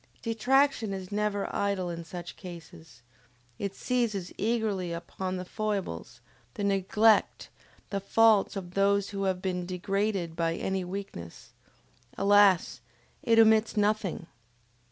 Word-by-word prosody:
Detraction 240 -1 +2
is 190 0 -7
never 205 -1 -1
idle 195 -3 -1
in 170 0 -6
such 175 0 -8
cases; 160 -7 -12 0.6
it 200 -1 -3
seizes 225 -8 -1
eagerly 210 -5 -1
upon 185 +2 -4
the 180 - -5
foibles, 190 - -4 0.3
the 205 - -4
neglect, 200 +2 +2 0.4
the 200 - -1
faults 215 +1 +3
of 180 -2 -6
those 200 0 +2
who 195 -1 -3
have 185 -1 -1
been 180 -1 -1
degraded 185 -1 -2
by 165 0 0
any 190 +1 -2
weakness: 180 - -8 0.7
alas, 200 -2 +4 0.4
it 230 -1 +2
omits 220 0 +5
nothing! 205 -4 0
195 Hz, 120 wpm, -28 LUFS, 180-210 Hz, 0.7 s, omits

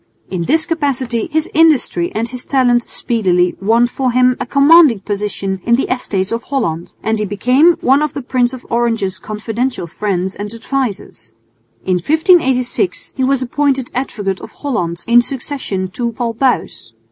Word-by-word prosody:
In 185 -2 -2
this 315 - +2
capacity 265 -8 -1
his 315 0 0
industry 295 - +2
and 225 +2 -1
his 250 +1 -6
talent 245 -3 +2
speedily 180 -7 0
won 225 +4 +3
for 255 +1 -1
him 250 +1 +3
a 250 - -4
commanding 280 - +5
position 200 -2 -3
in 235 - +3
the 265 - 0
Estates 195 -6 -3
of 230 0 -2
Holland, 195 - -3
and 220 0 0
he - - 0
became 250 - +3
one 270 +3 +3
of 300 -2 -2
the 280 - -4
Prince 245 -1 +1
of 260 -1 -9
Orange's 225 -5 0
confidential 220 +2 -3
friends 190 +1 -3
and 205 0 -6
advisers. 230 - -4 0.5
In 185 -1 +1
1586 310 - +1
he 260 - -1
was 265 0 +1
appointed 270 0 -1
Advocate 205 -7 -3
of - - -9
Holland 175 - -3
in 240 +1 +5
succession 250 -7 -4
to 235 +5 -3
Paul 230 0 -3
Buys. 230 - -1
240 Hz, 160 wpm, -16 LUFS, 205-270 Hz, 0.5 s, commanding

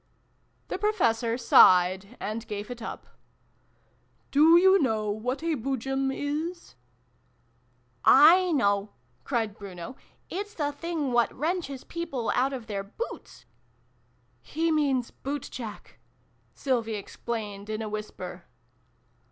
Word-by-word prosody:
" - - -41
The - - -3
Professor 235 - +1
sighed, 190 -2 +5
and 220 +2 -4
gave 205 +3 -5
it 240 -1 -7
up. 225 - -7 0.6
" - - -40
Do 315 +4 +7
you 380 +2 +6
know 220 -5 0
what 250 +8 -3
a 330 -1 +1
Boojum 270 +1 -1
is? 310 +6 -4 0.7
" - - -28
"7 335 +3 +7
know!" 200 -3 +1 0.3
cried 225 -5 -2
Bruno. 185 +1 -8 0.3
"It's 410 +3 -5
the 290 -2 -1
thing 305 -2 -3
what 240 -1 +3
wrenches 305 -3 -3
people 305 -9 -3
out 265 +2 +2
of 255 -4 -6
their 200 -2 -3
boots! 335 - -8 0.5
" - - -39
"He 325 +1 +2
means 275 -6 +1
' - - -39
bootjack, 255 -5 -6 0.2
' - - -39 0.3
Sylvie 235 -5 -1
explained 205 0 -6
in 215 +1 -3
a - - -4
whisper. 210 0 -7
255 Hz, 130 wpm, -27 LUFS, 215-305 Hz, 0.7 s, Do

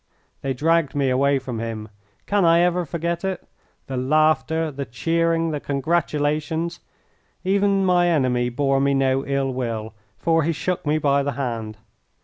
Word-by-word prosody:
They 135 -1 -2
dragged 160 +1 +1
me 135 -2 +1
away 140 +2 +3
from 125 -3 -5
him. 110 -1 -5 0.4
Can 205 -1 +1
I 170 0 +5
ever 180 0 +1
forget 170 +2 -3
it? 190 -1 -3 0.4
the 130 - -4
laughter, 155 +3 +2
the 140 0 -4
cheering, 165 +5 0
the 150 - -2
congratulations! 150 +2 -1 0.6
Even 195 +1 +2
my 175 -1 +3
enemy 130 -7 +1
bore 135 +2 +1
me 140 0 +2
no 135 0 +2
ill 135 -1 0
will, 115 -3 -3 0.2
for 165 -1 +2
he 165 +2 0
shook 175 +1 -3
me 150 +1 +2
by 140 -2 +2
the 140 0 -2
hand. 115 -5 -4
145 Hz, 155 wpm, -22 LUFS, 130-165 Hz, 0.6 s, I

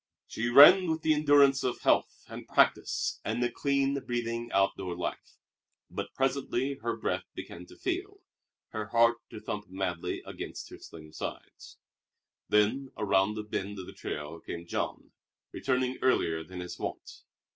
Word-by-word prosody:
She 120 +2 -3
ran 170 +8 +9
with 160 0 -1
the 155 - +4
endurance 145 -2 +5
of 125 -1 -2
health - - +1
and - - -9
practice - - +2
and 120 - -1
a 120 - 0
clean 140 +2 +1
breathing 120 -1 -3
outdoor 95 -2 +1
life; 90 - -5 0.5
but - - -5
presently 135 0 0
her 115 0 -1
breath 110 - -2
began 90 +1 -8
to - - -14
fail, 390 +3 -3 0.5
her 110 -1 -4
heart 115 +2 +4
to 110 - -8
thump 105 -1 -5
madly 90 -3 -3
against - - -7
her - - -10
slim 80 -1 -12
sides. - - -8 0.7
Then 115 +6 +2
around 100 +1 +2
a 105 - -3
bend 105 -1 -4
of 95 - -6
the - - -10
trail 75 +2 -6
came 85 +1 -7
Jean, - - -4 0.4
returning 130 -1 -1
earlier 80 -11 +2
than 90 +2 -8
his 90 - -7
wont. - - -6
115 Hz, 155 wpm, -30 LUFS, 95-135 Hz, 0.7 s, ran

